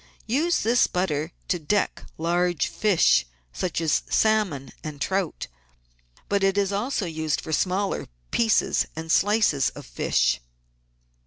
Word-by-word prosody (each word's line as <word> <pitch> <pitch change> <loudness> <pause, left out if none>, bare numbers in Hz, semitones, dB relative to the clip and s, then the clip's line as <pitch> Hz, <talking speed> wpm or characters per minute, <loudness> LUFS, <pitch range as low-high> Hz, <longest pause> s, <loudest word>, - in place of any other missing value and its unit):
Use 310 +10 +1
this 235 +2 +3
butter 170 -4 -1 0.2
to 175 - 0
deck 200 +6 -1
large 175 +1 +1
fish, 200 - +3 0.3
such 180 -3 -2
as 160 -2 +1
salmon 210 -11 +1
and 150 -2 -6
trout; 190 +3 -1 0.8
but 200 -1 +1
it 195 0 +2
is 200 -1 +1
also 210 +1 -1
used 160 -2 -2
for 160 - -7
smaller 190 +5 0 0.2
pieces 225 -2 +2
and 160 0 -4
slices 205 - +3
of - - -11
fish. - - +1
185 Hz, 130 wpm, -25 LUFS, 160-210 Hz, 0.8 s, this